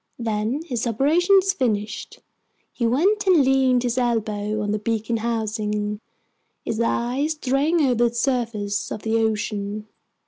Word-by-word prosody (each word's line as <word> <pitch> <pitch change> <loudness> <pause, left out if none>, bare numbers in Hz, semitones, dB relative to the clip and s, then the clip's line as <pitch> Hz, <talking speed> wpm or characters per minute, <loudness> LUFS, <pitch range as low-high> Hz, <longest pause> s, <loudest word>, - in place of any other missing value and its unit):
Then, 225 +5 -2
his 245 -6 -2
operations 350 - +3
finished, 215 - -2 0.5
he 235 - 0
went 385 - +2
and 335 -7 +5
leaned 260 -2 +3
his 245 +1 0
elbows 215 -3 -1
on 205 -1 -1
the 210 - -1
beacon 225 +1 -1
housing, 215 -2 -2 0.6
his 225 0 -2
eyes 250 +6 0
straying 300 +3 +1
over 240 -4 +3
the 235 - -14
surface 230 -5 -1
of 215 - -5
the 225 0 +1
ocean. 210 -1 -2
235 Hz, 135 wpm, -23 LUFS, 215-270 Hz, 0.6 s, and